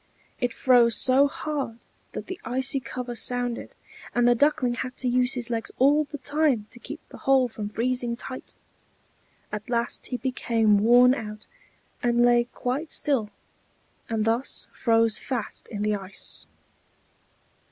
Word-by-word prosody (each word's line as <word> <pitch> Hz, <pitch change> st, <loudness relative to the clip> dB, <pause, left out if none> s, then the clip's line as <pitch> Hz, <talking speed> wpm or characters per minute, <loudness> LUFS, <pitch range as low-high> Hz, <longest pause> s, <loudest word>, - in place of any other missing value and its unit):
It 245 Hz, -2 st, 0 dB
froze 240 Hz, -1 st, +4 dB
so 270 Hz, +2 st, +5 dB
hard 280 Hz, -5 st, -4 dB, 0.4 s
that -, -, -5 dB
the 370 Hz, -, -7 dB
icy 260 Hz, +3 st, 0 dB
cover 250 Hz, -1 st, -6 dB
sounded; 245 Hz, +1 st, +1 dB, 0.4 s
and 245 Hz, 0 st, +4 dB
the 245 Hz, -, +6 dB
Duckling 250 Hz, -1 st, +2 dB
had 255 Hz, +1 st, -5 dB
to 255 Hz, -, -3 dB
use 250 Hz, +1 st, +2 dB
his 245 Hz, -1 st, -2 dB
legs 225 Hz, -1 st, -2 dB
all 290 Hz, +4 st, +4 dB
the 290 Hz, -, -7 dB
time 280 Hz, -4 st, +1 dB
to 240 Hz, -, -12 dB
keep 295 Hz, +5 st, -8 dB
the -, -, -12 dB
hole 270 Hz, -2 st, +3 dB
from 215 Hz, -3 st, -6 dB
freezing 240 Hz, +2 st, -1 dB
tight. 255 Hz, +2 st, -8 dB, 1.0 s
At 210 Hz, +2 st, -6 dB
last 235 Hz, -1 st, -1 dB
he 250 Hz, -, -3 dB
became 230 Hz, -5 st, +2 dB
worn 245 Hz, +4 st, +6 dB
out, 215 Hz, -4 st, -6 dB, 0.6 s
and 240 Hz, 0 st, +3 dB
lay 240 Hz, 0 st, +4 dB
quite 260 Hz, +6 st, -4 dB
still, 260 Hz, -8 st, 0 dB, 0.8 s
and 220 Hz, -1 st, 0 dB
thus 230 Hz, +4 st, -1 dB
froze 225 Hz, -2 st, +2 dB
fast 245 Hz, -5 st, -4 dB
in 210 Hz, -3 st, -4 dB
the 210 Hz, 0 st, +1 dB
ice. 195 Hz, -2 st, -8 dB
245 Hz, 150 wpm, -25 LUFS, 230-260 Hz, 1.0 s, the